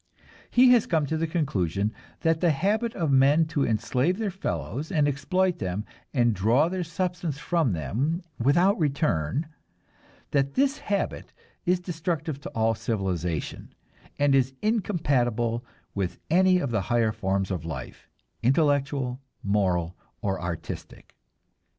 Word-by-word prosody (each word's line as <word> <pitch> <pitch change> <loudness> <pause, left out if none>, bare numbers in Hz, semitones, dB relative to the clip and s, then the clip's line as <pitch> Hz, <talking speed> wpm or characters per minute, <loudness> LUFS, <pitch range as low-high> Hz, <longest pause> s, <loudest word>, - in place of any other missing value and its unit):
He 250 +1 +6
has 240 -3 +5
come 160 -4 +2
to 160 - -2
the 165 +1 0
conclusion 105 - 0 0.3
that 165 -1 +2
the 175 - +4
habit 210 +10 +1
of 165 -6 0
men 140 +4 +5
to 145 -4 0
enslave 125 - +1
their 215 -3 -1
fellows 160 - -4
and 150 -5 +3
exploit 180 +6 0
them 95 +2 -3 0.3
and 120 -4 +3
draw 115 - +3
their 185 0 -2
substance 170 -2 -3
from 155 - +1
them 135 - -1 0.2
without 175 - +3
return 140 - 0 0.9
that 140 -1 +1
this 275 +2 +2
habit 200 -1 -2 0.3
is 180 0 +3
destructive 165 -4 -3
to - - -6
all 115 0 +2
civilization, 90 - -3 0.4
and 145 -1 +3
is 135 0 +2
incompatible 130 - +1 0.3
with 95 -3 -2
any 185 +1 +5
of 140 -8 -1
the 110 -3 +1
higher 115 +2 +1
forms 95 -1 -1
of 90 -4 -2
life, 80 -6 -7 0.3
intellectual, 135 -1 +1 0.2
moral 90 -4 +1 0.3
or 95 -3 -1
artistic. 85 -2 -6
140 Hz, 135 wpm, -26 LUFS, 110-170 Hz, 0.9 s, He